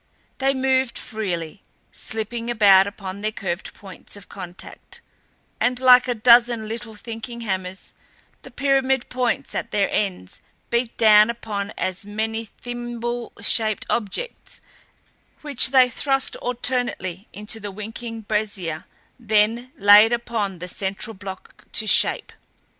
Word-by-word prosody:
They 270 0 +2
moved 260 -2 +1
freely, 190 -4 -4 0.3
slipping 230 +2 -4
about 200 -4 +6
upon 200 -1 -7
their 215 +1 -1
curved 190 -3 -4
points 195 0 -12
of 205 - -12
contact 180 -2 -9 0.6
and 250 0 +1
like 255 0 +6
a 245 - 0
dozen 235 0 +5
little 225 0 -6
thinking 230 +2 -7
hammers, 190 -3 -4 0.5
the - - -12
pyramid 265 0 +1
points 250 -2 -1
at - - -3
their 200 -2 +1
ends 185 - -3 0.3
beat 235 0 -1
down 215 -1 +6
upon 210 -4 -4
as 185 +1 -3
many 220 +2 -3
thimble 240 +1 -6
shaped 215 -2 +2
objects 235 - -4 0.8
which 285 -5 +4
they 260 -1 +6
thrust 270 +2 0
alternately 245 -6 -2
into 210 +3 -4
the 205 -1 -6
unwinking 225 +3 -7
brazier 200 -6 -3 0.3
then 225 +2 +1
laid 205 +3 +7
upon 230 -5 -2
the 180 +1 -7
central 195 +4 -4
block 190 -2 -10
to 220 - 0
shape. - - +2
220 Hz, 125 wpm, -22 LUFS, 200-240 Hz, 0.8 s, laid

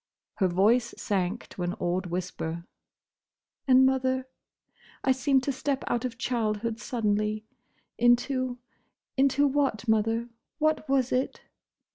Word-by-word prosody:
Her 190 - +3
voice 220 +7 +2
sank 195 +1 -1
to - - -8
an 175 +2 -1
awed 180 -2 -1
whisper. 170 -1 -4 1.0
"And—Mother!—I 260 0 0
seemed 265 0 +2
to 280 - 0
step 270 +1 -2
out 240 +1 -1
of 235 -2 -4
childhood 230 -2 -1
suddenly, 215 -2 -1 0.5
into—into 255 +2 0
what, 270 -5 0
Mother?—What 230 +8 0
was 265 -2 +2
it?" 255 +2 -1
240 Hz, 100 wpm, -28 LUFS, 210-260 Hz, 1.0 s, Her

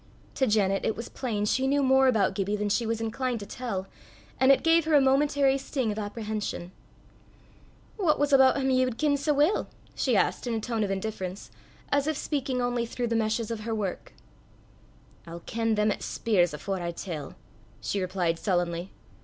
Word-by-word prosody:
To 265 - +1
Janet 195 -3 +2
it 220 - 0
was 230 - -7
plain 220 -6 -2
she 260 +5 +1
knew 280 +1 +2
more 265 0 +5
about 220 -6 +3
Gibbie 200 +1 -1
than 210 0 -1
she 230 +3 +1
was 225 0 -1
inclined 240 +2 -2
to 205 - -7
tell, 200 -4 -4 0.5
and 265 +1 +6
it 275 - +3
gave 330 0 +4
her 315 -1 +3
a - - +8
momentary 275 0 +3
sting 260 -4 -2
of 210 - -4
apprehension. 210 -4 -4 1.3
"What 345 -8 +2
was 290 0 +1
aboot 265 0 +6
him 265 -1 +1
ye 255 0 +4
wad 255 -3 -2
ken 295 -2 +2
sae 285 +2 0
weel?" 295 +8 +2 0.3
she - - +1
asked - - 0
in 235 - -1
a - - -1
tone 225 -1 -2
of 200 - -2
indifference, 195 -1 -4 0.4
as 285 0 +2
if 315 -2 0
speaking 270 -5 -2
only 245 -1 -1
through 240 0 -3
the 230 - 0
meshes 225 0 0
of 225 - -3
her 225 +1 -3
work. 200 - -4 1.1
"I'll 170 +1 -8
ken 225 -1 0
them 210 0 +2
'at - - -3
speirs 185 -7 +1
afore 190 +5 -4
I 170 - -2
tell," 160 -6 -6 0.4
she 200 - -2
replied 180 -3 -1
sullenly. 175 -2 -1
225 Hz, 195 wpm, -27 LUFS, 200-265 Hz, 1.3 s, a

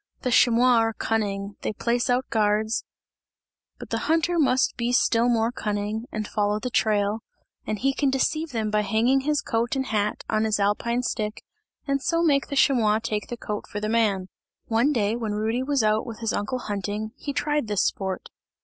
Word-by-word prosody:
The 250 - 0
chamois 240 +1 +5
are 225 0 +1
cunning, 200 -2 -2
they - - -2
place 240 +4 0
out 250 +1 +1
guards 215 0 +1 0.9
but - - -10
the - - 0
hunter 330 +2 +2
must 260 -4 +2
be 235 0 -1
still 240 -1 +3
more 230 -1 +2
cunning 210 +1 -3
and 215 -1 -3
follow 210 -1 0
the 250 +3 -4
trail 210 -1 +1 0.5
and 215 - -1
he 270 +6 +1
can 280 0 +1
deceive 310 +4 0
them 220 -5 -2
by 210 0 +2
hanging 230 +5 +2
his 295 +2 0
coat 230 +3 -1
and 265 0 -1
hat 210 -3 -1
on 215 0 +1
his 215 -1 +1
alpine 235 +5 0
stick, 215 -3 -3 0.4
and 275 0 0
so 335 +4 +1
make 280 -4 +2
the 280 - -4
chamois 230 -6 +4
take 215 -1 -3
the 240 - -5
coat 210 -2 -5
for 205 - -5
the 215 +1 -2
man. 210 -5 +1 0.4
One 235 +6 +2
day 220 -5 +1
when 225 -3 -3
Rudy 220 +4 0
was 275 -2 +1
out 215 +2 +1
with 225 -2 -6
his 225 -2 -2
uncle 210 +5 -2
hunting, 210 -1 -4
he 285 - -5
tried 295 -2 -1
this 205 -2 +1
sport. 190 -1 -3
225 Hz, 195 wpm, -25 LUFS, 210-255 Hz, 0.9 s, chamois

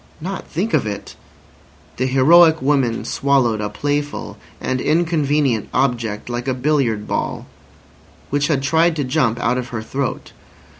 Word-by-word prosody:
Not 185 +4 -5
think 195 +8 -3
of - - +2
it! 100 -1 -6 0.8
The 130 - 0
heroic 160 +5 +6
woman 130 -4 +1
swallowed 130 -6 +1
a 105 - -2
playful 145 +6 -3 0.2
and 130 -1 -2
inconvenient 150 -7 +1
object 120 -5 -1
like 120 +1 -4
a 130 - 0
billiard 130 -6 0
ball, - - -3 0.9
which 145 0 +1
had 140 -4 0
tried 160 +3 +3
to 145 - -1
jump 125 -4 0
out 125 +2 +1
of 125 - -5
her 110 -3 -5
throat. 135 +3 -4
135 Hz, 145 wpm, -19 LUFS, 120-150 Hz, 0.9 s, heroic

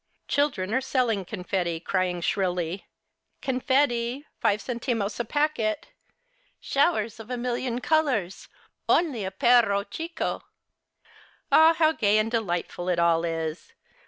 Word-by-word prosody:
Children 230 -9 0
are 260 - +2
selling 245 -7 0
confetti, 180 -3 -2
crying 180 0 -1
shrilly, 180 +1 -1 0.3
" - - -51
Confetti, 260 0 0
five 205 - +2
centimos 230 -3 -3
a 235 - -1
packet. 290 -1 -1 0.7
Showers 240 -7 0
of 225 +1 -10
a 250 - -2
million 245 0 -2
colours! 260 - 0 0.4
Only 290 - +2
a - - -2
perro 205 -1 +3
Chico! 330 - -4 0.4
" - - -33
' - - -34
Ah, 320 +1 +7
how 315 -1 +4
gay 210 -8 +2
and 215 +1 +1
delightful 175 -5 -2
it 180 - +1
all 170 -1 +3
is 165 -1 -4
225 Hz, 130 wpm, -26 LUFS, 185-260 Hz, 0.7 s, Ah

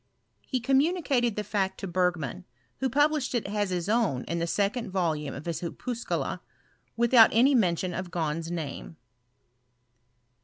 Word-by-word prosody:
He 255 - -2
communicated 270 - +2
the 210 - -2
fact 190 -2 -1
to 195 - -4
Bergman, 175 -6 -1 0.3
who 265 - 0
published 290 0 +1
it 235 - 0
as 205 0 -1
his 180 -1 -2
own 210 - +1
in 170 +2 -3
the 170 - -1
second 205 +4 -1
voluii^ 160 -6 -1
of 140 - -8
his 170 -2 -3
Opuscula, 235 +7 -3 0.6
urithout 235 -1 +7
any 255 +5 +4
mention 180 -6 +1
of 185 0 -4
Gahn's 165 -1 -2
name. 165 -1 -5
195 Hz, 145 wpm, -27 LUFS, 170-240 Hz, 0.6 s, urithout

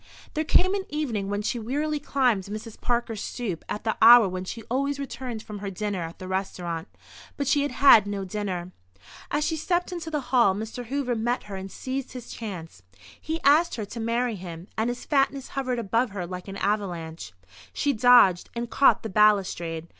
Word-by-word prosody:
There 310 - 0
came 370 +4 +3
an 395 -1 -2
evening 235 -10 -2
when 205 +1 -2
she 235 - -1
wearily 295 +6 -1
climbed 250 -9 +1
Mrs. 215 +2 -8
Parker's 235 -3 -1
stoop 205 -10 -4
at 210 - -4
the 220 -1 -1
hour 235 -2 +9
when 185 0 -4
she 225 +4 -6
always 275 +5 -1
returned 255 -5 -5
from 210 -1 -8
her 200 0 -4
dinner 200 -1 -3
at 165 0 -6
the 185 - -8
restaurant. 180 -2 -3 0.5
But 280 - -2
she 285 +1 +3
had 285 - 0
had 230 -6 +7
no 200 -1 -3
dinner. 185 -3 -4 0.6
As 295 +1 0
she 325 - 0
stepped 350 +3 -1
into 345 -2 -5
the 305 -2 -1
hall 235 -7 +5
Mr. 220 +4 -5
Hoover 270 -1 -1
met 240 +2 -1
her 205 -2 -8
and 190 0 -7
seized 265 0 -5
his 250 -2 -8
chance. 180 - -7 0.4
He 320 +1 -3
asked 310 +5 +4
her 220 -3 -4
to 230 +4 -8
marry 230 0 0
him, 175 -1 -8
and 220 +2 0
his 245 0 -5
fatness 275 -2 +1
hovered 255 -2 -2
above 230 +2 0
her 195 -3 -5
like 180 +1 -7
an 195 0 -6
avalanche. 175 - -3 0.4
She 285 - 0
dodged, 235 -6 +5
and 235 0 -4
caught 275 - +4
the 220 - -4
balustrade. 185 -5 +2
225 Hz, 195 wpm, -26 LUFS, 195-265 Hz, 0.6 s, hour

